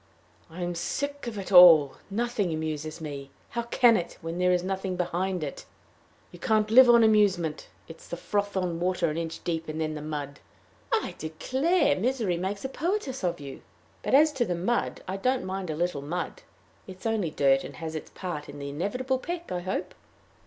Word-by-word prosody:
"I 175 Hz, +2 st, -6 dB
am 175 Hz, 0 st, -2 dB
sick 285 Hz, +10 st, -3 dB
of 225 Hz, -3 st, -5 dB
it 195 Hz, 0 st, -6 dB
all. 165 Hz, -6 st, +9 dB, 0.2 s
Nothing 215 Hz, -3 st, -1 dB
amuses 155 Hz, 0 st, -4 dB
me. 140 Hz, -3 st, -6 dB, 0.2 s
How 235 Hz, -, -2 dB
can 235 Hz, 0 st, +4 dB
it, 175 Hz, -4 st, -3 dB
when 165 Hz, +2 st, -5 dB
there 180 Hz, 0 st, +3 dB
is 180 Hz, -1 st, +2 dB
nothing 190 Hz, 0 st, -2 dB
behind 180 Hz, 0 st, -1 dB
it? 140 Hz, -, -6 dB, 0.6 s
You 175 Hz, -, -13 dB
can't 215 Hz, +1 st, +1 dB
live 250 Hz, +2 st, +8 dB
on 235 Hz, -1 st, +7 dB
amusement. 195 Hz, -8 st, +2 dB, 0.2 s
It 165 Hz, -, -10 dB
is -, -, -15 dB
the 175 Hz, -, -5 dB
froth 205 Hz, +2 st, -2 dB
on 175 Hz, -3 st, -1 dB
water 180 Hz, -2 st, +1 dB
an 155 Hz, -, -4 dB
inch 165 Hz, -1 st, -5 dB
deep, 165 Hz, -2 st, -3 dB
and 155 Hz, +1 st, -4 dB
then 155 Hz, -1 st, -1 dB
the 150 Hz, -, -6 dB
mud!" 145 Hz, -2 st, -5 dB, 0.5 s
"I 450 Hz, -2 st, 0 dB
declare, 270 Hz, -, +1 dB
misery 225 Hz, -6 st, 0 dB
makes 195 Hz, +6 st, -3 dB
a -, -, -2 dB
poetess 305 Hz, -, -2 dB
of 175 Hz, -4 st, -1 dB
you! 140 Hz, -2 st, -9 dB, 0.4 s
But -, -, +2 dB
as 305 Hz, +2 st, +6 dB
to 265 Hz, -4 st, +1 dB
the 180 Hz, -6 st, -2 dB
mud, 195 Hz, +8 st, -1 dB
I 190 Hz, +1 st, -3 dB
don't 255 Hz, +4 st, 0 dB
mind 190 Hz, -1 st, -4 dB
a 155 Hz, -, -2 dB
little 175 Hz, -3 st, -1 dB
mud. 175 Hz, -, -4 dB, 0.5 s
It 185 Hz, -1 st, -9 dB
is -, -, -14 dB
only 220 Hz, -6 st, 0 dB
dirt, 135 Hz, -2 st, +3 dB
and -, -, -8 dB
has 160 Hz, -1 st, -6 dB
its 155 Hz, -, -6 dB
part 170 Hz, -6 st, -5 dB
in 145 Hz, -, -9 dB
the 140 Hz, 0 st, -5 dB
inevitable 250 Hz, -, -2 dB
peck, 345 Hz, +3 st, -5 dB
I 180 Hz, -, -1 dB
hope." 185 Hz, +2 st, -3 dB
180 Hz, 200 wpm, -27 LUFS, 160-230 Hz, 0.6 s, all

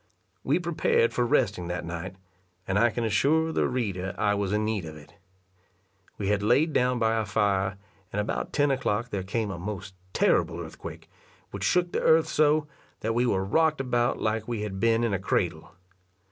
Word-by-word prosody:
We 140 Hz, -, +2 dB
prepared 170 Hz, -9 st, +1 dB
for 120 Hz, -1 st, +1 dB
resting 100 Hz, -8 st, +1 dB
that 90 Hz, -1 st, -4 dB
night, 85 Hz, +3 st, -6 dB, 0.5 s
and 95 Hz, +1 st, +1 dB
I 120 Hz, +2 st, +5 dB
can 120 Hz, +1 st, -3 dB
assure 145 Hz, +10 st, +2 dB
the -, -, +1 dB
reader 100 Hz, -7 st, -2 dB
I 105 Hz, -1 st, +2 dB
was 100 Hz, -1 st, -1 dB
in 105 Hz, 0 st, +1 dB
need 110 Hz, -3 st, -1 dB
of 80 Hz, -1 st, -8 dB
it. 75 Hz, -, -15 dB, 1.0 s
We 100 Hz, -1 st, -2 dB
had 105 Hz, -1 st, +1 dB
laid 140 Hz, +9 st, +3 dB
down 125 Hz, 0 st, +2 dB
by 115 Hz, -1 st, +2 dB
our 110 Hz, -1 st, 0 dB
fire, 100 Hz, -2 st, +1 dB, 0.3 s
and 105 Hz, -, -2 dB
about 105 Hz, -, -2 dB
ten 145 Hz, -1 st, +2 dB
o'clock 120 Hz, -3 st, -1 dB
there 100 Hz, -, -2 dB
came 105 Hz, +2 st, -2 dB
a 85 Hz, -, -6 dB
most 95 Hz, 0 st, -6 dB, 0.2 s
terrible -, -, +2 dB
earthquake, -, -, -9 dB, 0.4 s
which 100 Hz, -1 st, -6 dB
shook 175 Hz, -, +2 dB
the -, -, -1 dB
earth 160 Hz, 0 st, +5 dB
so, 150 Hz, 0 st, +2 dB, 0.4 s
that 110 Hz, +1 st, -1 dB
we 120 Hz, +2 st, +2 dB
were 95 Hz, -4 st, +1 dB
rocked 155 Hz, +8 st, +2 dB
about 120 Hz, -2 st, 0 dB
like 110 Hz, 0 st, -1 dB
we 115 Hz, -3 st, -3 dB
had 95 Hz, -2 st, -5 dB
been 115 Hz, +1 st, +3 dB
in 115 Hz, -3 st, 0 dB
a 95 Hz, -, 0 dB
cradle. 85 Hz, -4 st, -1 dB
110 Hz, 190 wpm, -27 LUFS, 95-125 Hz, 1.0 s, I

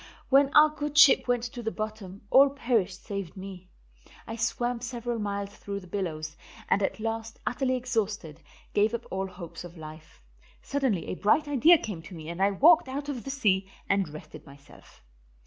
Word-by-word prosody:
When 275 Hz, +1 st, +5 dB
our 305 Hz, +1 st, +8 dB
good 295 Hz, -1 st, -5 dB
ship 280 Hz, -3 st, +7 dB
went 245 Hz, -1 st, +1 dB
to 240 Hz, 0 st, -6 dB
the 225 Hz, -, -2 dB
bottom, 215 Hz, -3 st, -6 dB
all 275 Hz, +1 st, +7 dB
perished 230 Hz, -9 st, -1 dB
save 200 Hz, -3 st, -5 dB
me. 185 Hz, -1 st, -9 dB, 0.6 s
I 225 Hz, -, -6 dB
swam 240 Hz, +1 st, -1 dB
several 240 Hz, -1 st, -4 dB
miles 200 Hz, -1 st, -3 dB
through 200 Hz, -1 st, -6 dB
the -, -, -13 dB
billows, 165 Hz, -4 st, -4 dB, 0.3 s
and 200 Hz, -, +2 dB
at 195 Hz, -, -1 dB
last, 225 Hz, 0 st, -4 dB
utterly 255 Hz, +1 st, 0 dB
exhausted, 215 Hz, -, -3 dB, 0.3 s
gave 215 Hz, +3 st, +2 dB
up 235 Hz, -, -6 dB
all 190 Hz, 0 st, -2 dB
hope 175 Hz, -3 st, -9 dB
of 175 Hz, 0 st, -11 dB
life. 155 Hz, 0 st, -11 dB, 0.4 s
Suddenly 265 Hz, -11 st, -1 dB
a -, -, -2 dB
bright 215 Hz, +11 st, +2 dB
idea 290 Hz, +5 st, +6 dB
came 205 Hz, -, -6 dB
to 175 Hz, +2 st, -11 dB
me 160 Hz, -1 st, -8 dB
and 170 Hz, +2 st, -5 dB
I 195 Hz, -, +5 dB
walked 310 Hz, -, +5 dB
out 280 Hz, +2 st, -5 dB
of 260 Hz, -4 st, -5 dB
the -, -, -5 dB
sea 195 Hz, -8 st, +1 dB, 0.2 s
and 195 Hz, -4 st, +1 dB
rested 155 Hz, +1 st, -11 dB
myself. 140 Hz, 0 st, -17 dB
215 Hz, 180 wpm, -28 LUFS, 185-255 Hz, 0.6 s, our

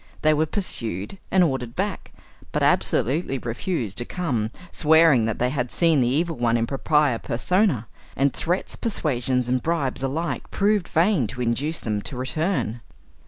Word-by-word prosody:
They 155 Hz, 0 st, +5 dB
were 155 Hz, +1 st, +1 dB
pursued 115 Hz, -, -2 dB
and 190 Hz, -1 st, +4 dB
ordered 130 Hz, -7 st, -2 dB
back, 195 Hz, 0 st, -3 dB, 0.4 s
but -, -, 0 dB
absolutely 135 Hz, +3 st, +1 dB
refused 120 Hz, -, -3 dB
to -, -, -2 dB
come, 125 Hz, -13 st, -2 dB, 0.2 s
swearing 160 Hz, -6 st, +5 dB
that 110 Hz, -1 st, -2 dB
they 125 Hz, +1 st, 0 dB
had 125 Hz, -3 st, -2 dB
seen 165 Hz, -5 st, +3 dB
the 120 Hz, -, +2 dB
Evil 160 Hz, +5 st, 0 dB
One, 120 Hz, -1 st, +2 dB
in 115 Hz, -, +1 dB
propria 140 Hz, 0 st, +1 dB
persona; 170 Hz, -, +1 dB, 0.3 s
and 140 Hz, 0 st, +2 dB
threats, 175 Hz, +3 st, -2 dB
persuasions, 130 Hz, -, -1 dB
and 125 Hz, 0 st, +1 dB
bribes 150 Hz, -6 st, -1 dB
alike 135 Hz, 0 st, -3 dB
proved 205 Hz, -3 st, +1 dB
vain 165 Hz, -, +2 dB
to 120 Hz, +4 st, -6 dB
induce 135 Hz, +7 st, -1 dB
them 105 Hz, -2 st, -2 dB
to 130 Hz, +4 st, -5 dB
return. 130 Hz, -, -1 dB
135 Hz, 160 wpm, -24 LUFS, 120-165 Hz, 0.4 s, They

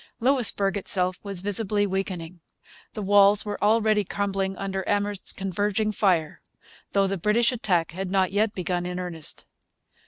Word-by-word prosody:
Louisbourg 230 Hz, -6 st, +2 dB
itself 185 Hz, -2 st, -1 dB
was 200 Hz, -3 st, -2 dB
visibly 205 Hz, +1 st, +1 dB
weakening. 185 Hz, -3 st, -4 dB, 0.5 s
The 210 Hz, -, -5 dB
walls 200 Hz, +1 st, +5 dB
were 205 Hz, -1 st, -4 dB
already 215 Hz, 0 st, +3 dB
crumbling 195 Hz, -1 st, -2 dB
under 195 Hz, -1 st, -3 dB
Amherst's 205 Hz, -1 st, 0 dB
converging 205 Hz, +3 st, -1 dB
fire, 180 Hz, -7 st, 0 dB, 0.5 s
though 200 Hz, -1 st, +3 dB
the 195 Hz, 0 st, -2 dB
British 215 Hz, +7 st, +2 dB
attack 185 Hz, -, 0 dB
had 185 Hz, +2 st, -5 dB
not 190 Hz, -1 st, +1 dB
yet 210 Hz, +2 st, 0 dB
begun 180 Hz, -1 st, -2 dB
in 180 Hz, 0 st, -5 dB
earnest. 170 Hz, -4 st, -2 dB
195 Hz, 145 wpm, -25 LUFS, 185-205 Hz, 0.5 s, walls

